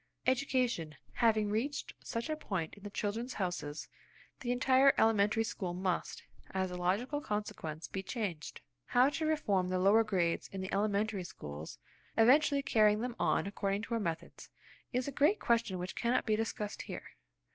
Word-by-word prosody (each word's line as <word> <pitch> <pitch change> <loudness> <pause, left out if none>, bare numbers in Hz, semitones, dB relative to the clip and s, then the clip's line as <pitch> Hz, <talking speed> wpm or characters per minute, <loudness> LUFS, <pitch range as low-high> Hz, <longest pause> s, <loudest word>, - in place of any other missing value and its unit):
Education 250 - +1 0.2
having 220 -3 +2
reached 265 +7 -2
such 230 0 -3
a 310 - -1
point 190 - -3
in 205 - -13
the 205 - -7
"Children's 220 +5 -3
Houses," 175 -6 -3 0.5
the 245 -2 -2
entire 260 +2 +5
elementary 220 0 +3
school 190 -6 -4
must, 185 -1 -2 0.3
as 190 -1 0
a - - -4
logical 205 +12 0
consequence, 165 - -4
be 190 +7 -4
changed. 190 -7 -4 0.2
How 250 +2 +4
to 310 +2 -2
reform 205 -13 +1
the 185 0 0
lower 200 +5 +5
grades 180 -6 0
in 195 - -7
the 190 - -5
elementary 205 -1 0
schools, 75 - -8 0.4
eventually 280 +4 +5
carrying 215 -3 +4
them 245 -1 -3
on - - +2
according 200 0 -2
to 235 - -4
our 230 - +1
methods, 165 -5 -5 0.4
is 250 +1 -1
a - - -2
great 300 +10 +3
question 230 -5 +1
which 180 +1 -5
cannot 235 +2 +1
be 215 - +2
discussed 215 -1 -3
here. - - -8
215 Hz, 165 wpm, -33 LUFS, 185-245 Hz, 0.5 s, entire